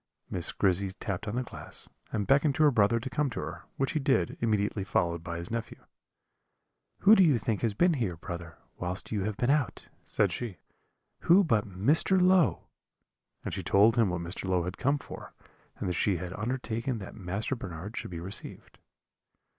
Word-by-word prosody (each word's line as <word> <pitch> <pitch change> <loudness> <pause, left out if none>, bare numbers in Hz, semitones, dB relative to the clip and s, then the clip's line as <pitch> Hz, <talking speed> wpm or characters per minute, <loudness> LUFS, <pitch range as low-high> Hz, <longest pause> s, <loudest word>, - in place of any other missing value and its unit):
Miss 90 - +1
Grizzy 95 0 +1
tapped 100 +2 -4
on 105 - -3
the 125 - 0
glass, - - -5 0.2
and 105 -2 -1
beckoned 140 +3 +3
to 155 - +3
her 150 - +6
brother 115 -1 +3
to 125 - -6
come 145 +1 0
to 120 - -5
her, - - -6
which 135 +2 0
he 160 - 0
did, 135 -1 +1
immediately 105 -3 0
followed 85 -2 0
by 85 -1 -4
his 85 +4 -6
nephew. 115 -1 -4 1.2
"'Who 205 - +7
do 195 - +7
you 150 -8 +4
think 110 -1 -2
has 110 -4 0
been 175 - +4
here, 110 - -2
brother, 85 -1 -7 0.2
whilst 90 +2 -4
you 100 -3 -1
have 105 -1 -3
been 125 +2 +2
out?' 145 -4 -1
said - - +1
she; 115 -8 -5 0.6
'who 185 +4 +5
but 115 - +1
Mr. 140 - +3
Low?' 180 -2 +4 0.8
and - - -3
she - - -3
told 105 +4 +4
him 115 -5 +3
what 90 -1 -2
Mr. 85 +2 -3
Low 90 -2 +2
had 90 +2 -4
come 140 +3 +2
for, - - -10 0.4
and - - -3
that 90 - 0
she 95 +2 +1
had 90 +1 -6
undertaken 120 +2 -2
that 95 -4 -8
Master 100 +6 -3
Bernard 95 -1 -7
should - - -4
be 85 -2 -6
received. 95 +4 -7
110 Hz, 195 wpm, -29 LUFS, 90-135 Hz, 1.2 s, Who